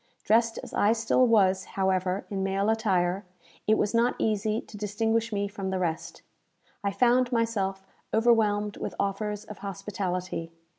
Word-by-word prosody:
Dressed 230 +1 +3
as - - -10
I 210 +2 +3
still 235 +2 +3
was, 190 -4 +4
however, 190 0 0
in 195 -1 -2
male 195 +2 +1
attire, 190 -4 +1 0.4
it 215 0 +4
was 205 - 0
not 235 +1 +3
easy 215 0 0
to 220 - -12
distinguish 225 +2 0
me 200 -1 -1
from 195 -2 -5
the 190 - -1
rest. 170 -3 -3 0.6
I 200 - +1
found 245 +4 +3
myself 200 -5 -1 0.3
overwhelmed 215 -3 +2
with - - -5
offers 210 +1 -2
of 210 - -10
hospitality. 185 -4 -4
205 Hz, 150 wpm, -27 LUFS, 190-225 Hz, 0.6 s, was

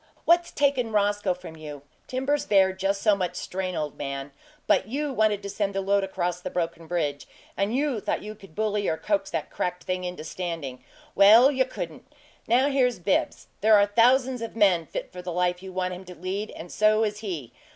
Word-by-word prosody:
What's 345 0 +4
taken 275 -5 +1
Roscoe 205 -2 +1
from 180 -3 -11
you? 150 -3 -9 0.2
Timbers 265 +3 -1
bear 190 -2 +4
just 195 +1 -1
so 210 -2 +5
much 180 -2 -2
strain, 185 0 -4
old 150 -3 -4
man; 140 0 -4 0.3
but 190 - +3
YOU 285 +4 -2
wanted 215 -3 +1
to 200 - -5
send 200 -1 -2
the 195 - 0
load 200 +1 +2
across 180 -2 -2
the - - -4
broken 165 -1 -3
bridge, 150 -4 -2 0.3
and 200 +4 0
you 275 -4 0
thought - - -2
you 210 +1 -6
could 195 -6 -16
bully 210 -1 0
or 160 - 0
coax 300 - -1
the - - -2
cracked 180 0 -3
thing 185 0 -2
into 180 -3 -5
standing. 165 -6 -5 0.3
Well, 225 +7 +7
you 260 -2 +2
couldn't! 170 - -7 0.4
Now 250 +4 +4
here's 255 -3 +2
Bibbs. 185 +2 0 0.2
There 215 +1 +6
are 205 -1 +6
thousands 245 +4 +3
of 230 -1 -6
men 185 -7 +3
fit - - -6
for 180 - -7
the 180 0 -5
life 180 +1 0
you 190 0 -8
want 185 0 -2
him 180 +1 -8
to 180 0 -10
lead 190 +5 -4
and 170 +1 -9
so 215 +1 +3
is 210 -1 -2
he. 165 - -5
195 Hz, 205 wpm, -26 LUFS, 180-220 Hz, 0.4 s, Well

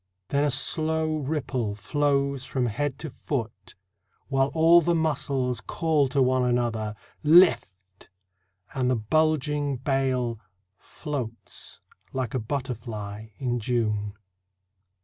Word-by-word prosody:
Then 140 +1 +2
a 150 - +2
slow 155 +3 +1
ripple 130 -7 -2
flows 140 +6 -1
along 130 - +2
the 145 +2 -3 0.2
body, 120 -7 0 0.8
While 135 -1 +2
all 165 +2 +6
the 170 +1 +1
muscles 135 -6 0
call 155 -2 +1
to 135 0 +3
one 130 0 +2
another: 120 -3 0 0.2
" - - -37 0.2
Lift! 95 - -5 0.2
" 95 0 -30
and 130 -2 0
the 130 - +3
bulging 150 +3 +1
bale 130 -3 0 0.4
Floats 125 - -7 0.3
like 130 -3 -2
a 130 - 0
butterfly 110 -4 -5
in 125 -3 -1
June. 105 -3 -1
130 Hz, 115 wpm, -26 LUFS, 115-145 Hz, 0.8 s, all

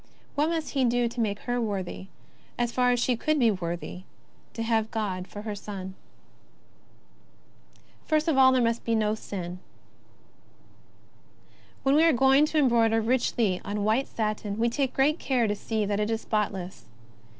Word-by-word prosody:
What 295 +2 +1
must 325 -2 -2
He 270 -2 +1
do 240 0 +2
to 235 +1 -4
make 205 -2 -1
her 245 0 -1
worthy, 195 -3 -4 0.5
as 240 -1 0
far 250 0 +2
as 245 0 +2
she 245 +1 +1
could 310 +6 0
be 235 -5 +4
worthy, 175 -1 -5 0.5
to 230 - -3
have 225 -1 +1
God 190 -5 -3
for 205 - -9
her 215 -1 -4
Son? 195 -2 -7 2.1
First 310 0 +1
of 320 - +2
all 260 -1 +7
there 255 -2 +3
must 230 0 0
be 230 - 0
no 215 -1 +1
sin. 180 -4 -6 2.2
When 270 - +3
we 305 +2 +5
are 330 -1 +5
going 270 +4 +4
to 315 - -2
embroider 230 -5 +3
richly 225 -4 +1
on 205 0 -3
white 220 +6 +1
satin, 210 -2 -3
we 235 +1 +2
take 265 +2 -2 0.2
care 250 -4 +1
to 205 - 0
see 220 0 -2
that 205 0 -1
it 210 +1 0
is 225 0 -1
spotless. 195 -4 -3
225 Hz, 165 wpm, -27 LUFS, 205-255 Hz, 2.2 s, all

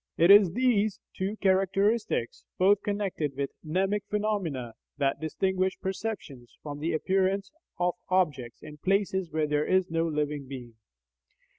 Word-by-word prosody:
It 170 +4 +6
is 200 -4 +7
these 215 -4 +2 0.2
two 195 +3 -3
characteristics, 195 - +1
both 195 +2 +4
connected 195 -8 -2
with 140 -1 -2
mnemic 190 +5 0
phenomena, 190 - -2 0.2
that 140 -2 0
distinguish 190 +4 0
perceptions 190 - -5
from 145 -1 -6
the 165 +3 -1
appearances 190 +4 0 0.3
of 180 0 +1 0.2
objects 150 -11 0
in 150 0 -10
places 190 0 0
where 155 0 +1
there 150 0 0
is 185 -2 +2
no 165 0 +1
living 150 -2 -2
being. 125 -3 -8
185 Hz, 135 wpm, -28 LUFS, 150-195 Hz, 0.3 s, is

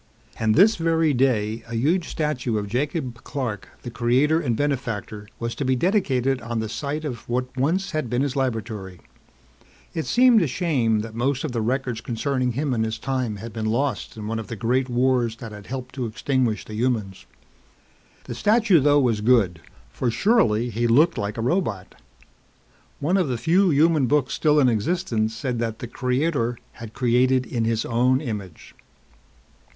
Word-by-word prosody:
And 110 -1 +2
this 210 +6 +5
very 165 -2 +2
day, 115 -4 +1
a 115 - -4
huge 160 +9 +1
statue 130 -7 -1
of 105 -1 -3
Jacob 125 - -3
Clark, 115 -8 -4
the 120 - -6
creator 130 +7 +2
and 120 -8 -1
benefactor, 115 -7 -3
was 115 0 -3
to - - -4
be 130 0 +2
dedicated 135 - +1
on 115 0 -4
the 110 -1 -2
site 150 +6 -4
of 120 -6 -6
what 125 +1 -2
once 165 +9 0
had 155 -7 -2
been 125 +3 +1
his 140 -1 -2
laboratory. 110 -8 -3 0.9
It 160 - -3
seemed 245 -2 +5
a 165 - +1
shame 125 - +1
that 110 0 -7
most 130 +3 -1
of 155 - -3
the 115 -2 -2
records 125 0 -1
concerning 125 +1 -1
him 140 +2 -1
and 110 -2 0
his 110 0 -2
time 125 -2 -2
had 110 +2 -8
been 110 0 -3
lost 120 0 -1
in 105 - -6
one 110 +1 -2
of 110 - -7
the 115 - -5
great 125 +4 0
wars 125 -2 +1
that 115 -1 -9
had 105 -1 -11
helped 130 -1 -6
to 130 -3 -3
extinguish 120 0 -1
the 110 - -9
humans. 110 -4 -2 1.0
The - - -6
statue 210 -5 +3
though 145 +1 +4
was 115 -5 +1
good 105 -8 +3 0.3
for 125 - -1
surely 120 - +2
he 120 +2 0
looked 150 +9 +4
like 105 +2 -3
a - - -2
robot. 115 - -1 1.1
One 170 +7 +1
of 180 -5 +1
the 125 -2 -1
few 180 - +3
human 155 -2 +3
books 145 0 +1
still 150 -1 +3
in 135 - +5
existence 115 - 0
said 120 +1 -3
that 115 -2 -2
the 120 - -6
Creator 125 0 -1
had 115 -1 -10
created 130 0 +2
in 115 -2 -2
his 115 -1 0
own 125 +2 +2
image. 105 - -7
125 Hz, 180 wpm, -23 LUFS, 115-145 Hz, 1.1 s, this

